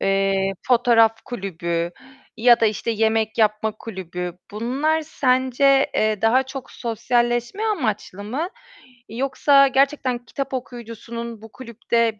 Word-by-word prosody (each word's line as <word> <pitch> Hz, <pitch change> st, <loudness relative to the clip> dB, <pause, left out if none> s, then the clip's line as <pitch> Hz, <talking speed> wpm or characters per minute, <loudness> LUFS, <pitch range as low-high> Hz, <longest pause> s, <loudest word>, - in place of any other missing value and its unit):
eee, 195 Hz, 0 st, +1 dB, 0.2 s
fotoğraf 230 Hz, -2 st, +4 dB
kulübü 170 Hz, -6 st, -3 dB, 0.5 s
ya 240 Hz, +1 st, +5 dB
da, 225 Hz, -, +4 dB
işte, 215 Hz, +2 st, -2 dB
yemek 220 Hz, 0 st, 0 dB
yapma 215 Hz, 0 st, +2 dB
kulübü. 180 Hz, -4 st, -6 dB, 0.2 s
Bunlar 265 Hz, +9 st, 0 dB
sence, 270 Hz, -1 st, +2 dB
eee, 215 Hz, -1 st, +1 dB
daha 240 Hz, +4 st, +4 dB
çok 265 Hz, 0 st, -9 dB
sosyalleşme 240 Hz, -, -1 dB
amaçlı 220 Hz, -, -2 dB
mı 275 Hz, -, -3 dB, 0.6 s
yoksa 275 Hz, +3 st, +3 dB
gerçekten 265 Hz, -3 st, +1 dB
kitap 275 Hz, +3 st, -5 dB
okuyucusunun 235 Hz, -2 st, -7 dB
bu 225 Hz, -1 st, -13 dB
kulüpte 230 Hz, -2 st, -1 dB
235 Hz, 115 wpm, -22 LUFS, 215-260 Hz, 0.6 s, ya